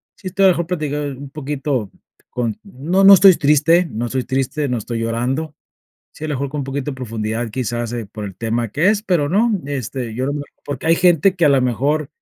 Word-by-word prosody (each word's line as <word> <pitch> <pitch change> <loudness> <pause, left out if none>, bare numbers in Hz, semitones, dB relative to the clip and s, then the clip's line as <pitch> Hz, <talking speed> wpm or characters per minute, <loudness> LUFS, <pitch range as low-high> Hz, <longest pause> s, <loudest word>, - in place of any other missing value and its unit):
sí 195 - -9
estoy, 195 +1 +2
a - - +8
la 185 - +5
mejor 170 0 -2
platicar 150 -4 -2
un 140 +1 -9
poquito 135 -6 -3 0.4
con 115 -3 -3
no, 185 +1 -1
no 195 +1 +10
estoy 195 -1 +8
triste, 155 +4 +3
no 115 +3 -3
estoy 130 +1 -2
triste, 135 +3 -1
no 125 -2 -1
estoy 115 +1 -4
llorando. 125 +7 -2 0.6
Sí, 155 - -9
a - - -3
la 150 - -1
mejor, 140 +1 -2
con 145 -1 -3
poquito 135 +1 -3
de - - -7
profundidad, 115 -2 -4
quizás, 120 -1 -3
eh, 120 -3 -4
por 105 +1 -8
el 95 - -7
tema 115 +3 -2
que 155 - +2
es, 210 0 +2
pero 175 -9 +1
no, 215 +8 +2 0.2
este, 130 -4 -4
yo 130 +3 -2
no 140 - -1
me 145 0 -3 0.2
porque 145 +1 -5
hay 165 - +5
gente 180 +2 +3
que, 170 - +2
a - - +6
la 135 -1 +4
mejor 135 +4 0
140 Hz, 230 wpm, -19 LUFS, 120-160 Hz, 0.6 s, no